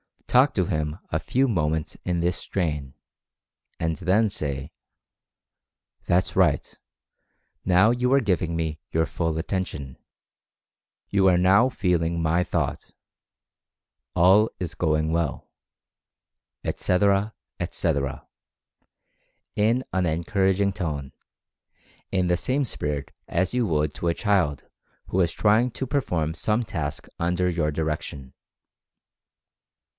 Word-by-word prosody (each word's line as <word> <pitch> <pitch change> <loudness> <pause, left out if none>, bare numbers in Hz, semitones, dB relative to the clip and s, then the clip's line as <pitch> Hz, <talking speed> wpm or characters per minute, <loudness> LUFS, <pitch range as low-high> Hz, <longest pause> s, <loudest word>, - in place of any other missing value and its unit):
Talk 135 +3 +4
to 95 -6 +1
him 75 -1 -2
a 80 - +1
few 130 +10 +1
moments 80 -5 -1
in 90 -2 0
this 90 +1 +1
strain, 75 -7 -3 0.9
and 80 -1 0
then 105 +4 +2
say: 70 -6 -4 1.3
"That's 90 +1 +1
right, - - +2 0.9
now 95 +4 +5
you 125 +1 +1
are 140 - +5
giving 90 -6 0
me 80 -2 -2
your 80 0 +2
full 80 -2 -2
attention 80 -6 -3 0.6
— - - -63
you 100 -1 +4
are 90 -2 +5
now 95 +7 +5
feeling 85 -8 0
my 85 +2 +2
Thought - - -2 0.6
— - - -62
all 95 +5 +5
is 90 -2 -4
going 80 -2 +1
well," 80 -3 -2 1.1
etc., 100 +3 +1 0.2
etc., 80 -6 -1 1.3
in 115 +5 +2
an 95 -1 +1
encouraging 95 +4 +1
tone, 75 -8 -4 1.0
in 95 -2 +1
the 90 0 +2
same 135 +9 0
spirit 75 - -3 0.2
as 90 +4 0
you 125 -3 +1
would 75 -3 0
to 85 - -3
a 85 - +3
child 95 - +1 0.4
who - - -3
was 85 -3 +2
trying 110 +4 +3
to 130 - -4
perform 90 - -1
some 105 +7 0
task 80 -7 -4
under 90 +1 +1
your 85 -3 0
direction. 75 -3 -4
90 Hz, 120 wpm, -25 LUFS, 80-100 Hz, 1.3 s, now